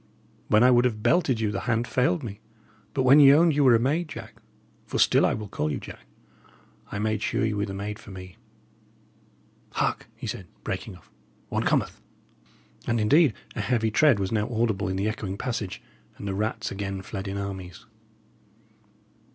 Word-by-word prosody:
When 110 +2 +4
I 125 - +6
would 120 0 +4
have 110 -4 -1
belted 155 -9 +2
you, 110 -2 0
the 100 - -2
hand 115 +1 +1
failed 150 +5 +1
me. 100 -4 -7 0.6
But 130 - +1
when 135 +3 +7
ye 140 -2 +9
owned 160 +3 +5
ye 145 - 0
were 130 -4 +6
a - - +3
maid, 150 +8 0
Jack - - -10 0.5
for - - -3
still - - +4
I - - 0
will 105 -1 -6
call 75 -5 -2
you - - -3
Jack - - -11 0.8
I - - -4
made 110 0 -1
sure 110 - 0
ye 110 - 0
were 105 0 -1
the 95 - -5
maid 105 +2 -5
for - - -13
me. 90 -1 -10 1.4
Hark!" - - -1
he - - -8
said, 90 - -5 0.2
breaking 95 +1 -4
off 85 - -20 0.4
"one - - -1
cometh." - - 0 0.9
And 115 - +1
indeed 135 +4 +4 0.2
a - - -2
heavy 110 +1 0
tread 140 +1 +4
was 95 -1 -2
now 110 +1 0
audible 110 -4 0
in 95 - -2
the 100 +2 -1
echoing 100 -3 -4
passage, 115 -6 -4 0.3
and 100 - -7
the 95 - -2
rats 110 +2 -2
again 95 -1 -4
fled 100 0 -6
in 100 +1 -4
armies. 95 +1 -6
110 Hz, 190 wpm, -26 LUFS, 100-125 Hz, 1.4 s, ye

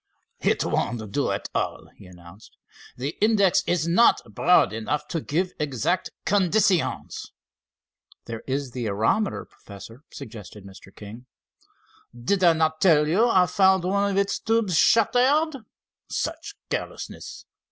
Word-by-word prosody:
"It - - 0
won't 110 -4 -2
do - - 0
at - - -3
all," - - -3
he - - -15
announced. 90 +3 -16 0.4
"The 135 +5 -4
index 205 -4 +3
is 170 -2 0
not 180 +8 +4
broad 165 - +3
enough 115 +7 -3
to 165 - -3
give 180 +6 -2
exact 150 +4 -1 0.2
conditions." 195 -2 0 0.9
"There 115 -1 -7
is 135 -1 -3
the 120 -2 -4
aerometer, 110 - 0
Professor," 110 +5 -13
suggested 105 -2 -11
Mr. 95 -1 -14
King. 110 +4 -11 0.9
"Did 185 +11 0
I 170 -2 +6
not 160 0 0
tell 150 -5 +4
you 200 +10 +3
I 185 -4 +4
found 190 -1 +3
one 200 +2 0
of 195 - -2
its 200 0 0
tubes 225 -5 0
shattered? 265 - +3 0.5
Such 330 +6 -4 0.2
carelessness! - - -6
165 Hz, 130 wpm, -24 LUFS, -, 0.9 s, I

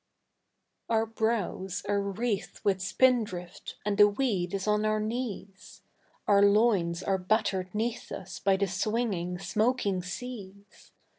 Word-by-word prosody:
Our 225 -1 +2
brows 220 -4 -2
are 200 0 +1
wreathed 200 +1 -3
with 195 -2 +1
spindrift 190 -3 0
and 210 0 -1
the 205 - +9
weed 205 -5 -1
is 195 - -3
on 210 0 +2
our 215 0 +1
knees; 215 -3 -5 0.4
Our 200 -1 +5
loins 200 -5 +3
are 195 -1 +1
battered 185 -1 0
'neath 230 +2 -2
us 185 -2 -7
by 195 -1 +2
the 200 - +1
swinging, 190 -2 -1
smoking 205 +1 0
seas. 200 0 -9
200 Hz, 130 wpm, -29 LUFS, 190-220 Hz, 0.4 s, the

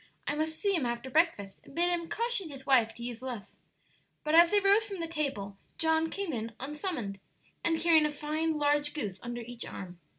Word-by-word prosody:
I - - 0
must 315 +1 -1
see 400 +2 +1
him 335 -7 +1
after 240 +2 -4
breakfast 300 - +1
and - - -15
bid 350 +1 +3
him 340 -1 -2
caution 465 -6 0
his 270 -2 -9
wife 245 -5 +5
to 235 - -8
use 240 -1 -5
less." 245 -6 -7 0.6
But 305 - -1
as 340 +1 +8
they 415 - +4
rose 400 +2 +5
from 400 -4 -6
the 335 - -1
table 270 -12 -3 0.2
John 320 0 +2
came 395 -4 -3
in 230 -1 -3
unsummoned, 270 - -4 0.4
and 325 -1 +2
carrying 320 -2 +5
a - - -3
fine 305 +2 -1
large 295 0 +2
goose 200 -10 -3
under 240 0 -5
each 240 0 -6
arm. 180 -2 -8
300 Hz, 205 wpm, -30 LUFS, 240-335 Hz, 0.6 s, as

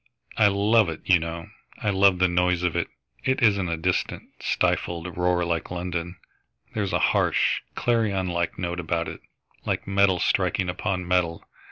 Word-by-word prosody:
I 105 - +5
love 100 0 +3
it, 80 - -6
you 90 -2 +5
know. 85 0 -6 0.3
I 105 - -1
love 95 -1 +4
the 90 +1 +4
noise 90 0 +1
of 90 -2 0
it. - - 0 0.4
It 130 -1 0
isn't 100 -5 +3
a 85 - -1
distant, 90 +3 -1 0.2
stifled 85 +1 -1
roar 90 0 +1
like 85 -1 -2
London. 90 0 -4 0.6
There's 100 -3 -1
a - - +2 0.2
harsh, - - +2
clarion 110 -6 +1
like 85 -1 -2
note 90 -1 -3
about 85 0 -1
it, - - -7 0.4
like - - -2
metal 95 -1 +3
striking 90 +2 +1
upon 90 0 -2
metal. 90 -2 0
90 Hz, 165 wpm, -25 LUFS, 85-100 Hz, 0.6 s, I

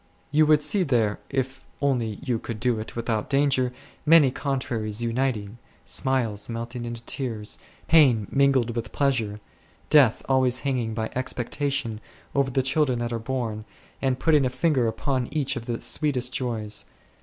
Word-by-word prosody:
You 155 +1 +4
would 150 -1 +5
see 190 +7 +3
there, 120 - +1
if 135 -1 -2 0.2
only 120 -7 0
you 120 -4 -1
could 115 -1 -6
do 120 -1 +1
it 110 - -7
without 115 -2 -2
danger, 135 -3 +2 0.3
many 150 -4 +6
contraries 120 -6 -2
uniting; 115 -3 -1 0.3
smiles 120 -7 -1
melting 120 +1 -5
into 120 0 -6
tears, 115 -5 -3 0.3
pain 130 -10 +5
mingled 135 -4 +3
with 115 -2 -4
pleasure, 115 -7 0 0.5
death 135 -7 +5
always 130 -1 +2
hanging 125 -5 -1
by 110 -1 -2
expectation 125 -2 -2 0.3
over 140 -1 +2
the 130 +1 +1
children 135 -1 +2
that 120 0 -2
are 115 - -2
born, 115 -3 -3 0.4
and 130 -2 +1
putting 150 -1 +3
a 130 - +2
finger 130 -1 +1
upon 130 +2 -1
each 150 -4 0
of 115 0 -6
the 120 -1 -2
sweetest 130 -5 0
joys. 110 -4 -2
125 Hz, 155 wpm, -25 LUFS, 115-135 Hz, 0.5 s, many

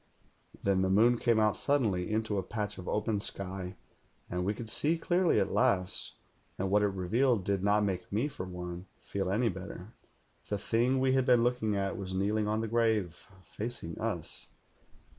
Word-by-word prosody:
"Then 95 -1 +2
the 95 - +1
moon 115 +5 +4
came 115 -2 +3
out 105 -1 +3
suddenly 110 -12 +1
into 110 -1 0
a - - 0
patch 105 0 -4
of 90 - -8
open 105 0 0
sky, 95 -2 -4 0.6
and 90 0 -1
we 100 +3 0
could 115 - -7
see 150 +9 +1
clearly 175 +2 +2
at - - 0
last, 100 -8 +1 0.4
and 95 0 -2
what 105 +1 +4
it 105 - +3
revealed 100 +4 +1
did 100 -1 0
not 105 +1 +3
make 95 -3 -2
me, 110 +8 +1
for 135 -10 -6
one, 90 0 -6
feel 95 -2 -3
any 115 +5 +2
better. 95 +2 -8 0.6
The 105 - 0
thing 120 +6 +1
we 130 0 +3
had 130 -1 +2
been 120 -2 +5
looking 120 -4 +1
at 100 +2 -1
was 95 -2 -5
kneel 100 +3 +1
ing 105 - 0
on 110 +1 0
the 115 - -2
grave, 110 -6 0 0.2
facing 105 -7 -5
us. - - -3
105 Hz, 185 wpm, -31 LUFS, 95-115 Hz, 0.6 s, been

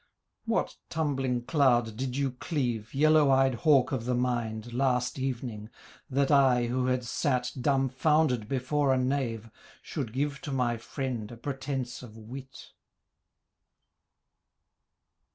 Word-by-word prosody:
'What - - -1
tumbling 135 -6 -1
cloud 120 -6 +2
did 130 +2 -3
you 140 -2 0
cleave, 125 -5 -3
Yellow 155 0 +5
eyed 135 0 +4
hawk 135 +3 +3
of 125 -4 -2
the 125 0 0
mind, 120 -2 -2
Last 125 0 0
evening? 120 -5 -4 0.4
that 140 +1 +1
I, 130 -4 +5
who 125 +2 0
had 125 -1 0
sat 125 0 0
Dumbfounded 135 -2 +2
before 135 +2 +1
a - - +1
knave, 125 -4 -1 0.3
Should 135 -8 -4
give 140 +3 -2
to 155 -5 -5
my 125 -3 0
friend 120 -2 -4
A 120 - -9
pretence 135 -1 -4
of 115 -3 -12
wit.' 130 +4 -10
130 Hz, 125 wpm, -29 LUFS, 120-140 Hz, 0.4 s, Yellow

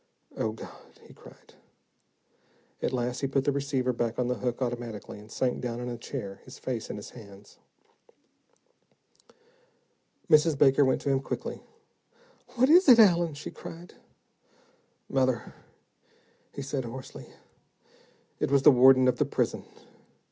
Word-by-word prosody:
"Oh, 110 - -1
God," 110 - -13
he - - -16
cried. - - -18 1.3
At - - -1
last, 125 0 -2
he 135 - -1
put 135 0 0
the 145 - +1
receiver 135 -2 -1
back 115 -1 -2
on 125 - 0
the 125 - 0
hook, 125 0 -3
automatically, 120 -5 -5
and 105 +1 -15
sank 125 +1 -1
down 120 -2 -4
in 125 0 -5
a 120 - -4
chair, 115 -4 -7
his 130 - -12
face 120 -4 -5
in - - -5
his 105 - -9
hands. 100 -4 -15 2.7
Mrs. 155 -2 +4
Baker 135 0 +5
went 130 -1 +1
to 140 - -1
him 135 - +2
quickly. 135 - -5 0.9
"What 255 +1 +4
is 345 +2 +6
it, 245 - +9
Allen?" 175 -7 +4
she 145 - -8
cried. 170 +2 -11 1.1
"Mother," 130 -3 -1 1.0
he 140 - -7
said 135 -1 -3
hoarsely, 120 +2 -9 1.1
"it - - 0
was 140 -1 +3
the 150 - +9
warden 130 0 +6
of 125 - +2
the - - +3
prison. - - -2
130 Hz, 145 wpm, -28 LUFS, 120-140 Hz, 2.7 s, it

